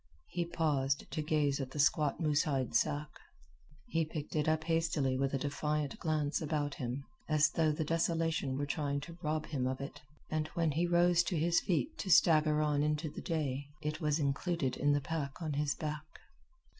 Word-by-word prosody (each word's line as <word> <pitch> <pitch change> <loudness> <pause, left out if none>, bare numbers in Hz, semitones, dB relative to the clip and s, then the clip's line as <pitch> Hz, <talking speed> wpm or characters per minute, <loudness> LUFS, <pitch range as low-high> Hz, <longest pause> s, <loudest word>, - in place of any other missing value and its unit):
He 175 -1 -1
paused 145 -5 0
to 155 - -2
gaze 150 -2 +1
at 130 - -4
the 140 - -9
squat 150 0 +3
moose 150 -3 +2
hide 135 -5 -1
sack. 150 0 +1 0.8
He 165 0 0
picked 155 -1 -6
it 150 0 +2
up 160 0 +1
hastily 160 -5 +1
with 135 +1 0
a - - +2
defiant 145 +1 -2
glance 155 -2 0
about 150 -2 -1
him, 130 +2 -4 0.2
as 155 -1 +4
though 160 -2 +2
the 150 +1 -1
desolation 165 -4 0
were 145 - -1
trying 145 -1 -1
to 170 +3 -10
rob 155 0 -1
him 130 -4 -1
of 130 0 -2
it; 140 +1 -7 0.3
and 155 -1 0
when 165 -2 +2
he 165 +4 +1
rose 175 0 +4
to 175 - -1
his 170 +2 +3
feet 165 - -1
to 190 - -3
stagger 155 -3 +5
on 150 -1 +1
into 150 +1 0
the - - -7
day, 145 -4 -2 0.2
it 150 +3 -3
was 150 -1 +2
included 145 -1 0
in 145 +1 +2
the 145 - +1
pack 140 -2 -4
on 155 -3 -3
his 145 0 0
back. 150 0 -4
150 Hz, 195 wpm, -33 LUFS, 145-160 Hz, 0.8 s, stagger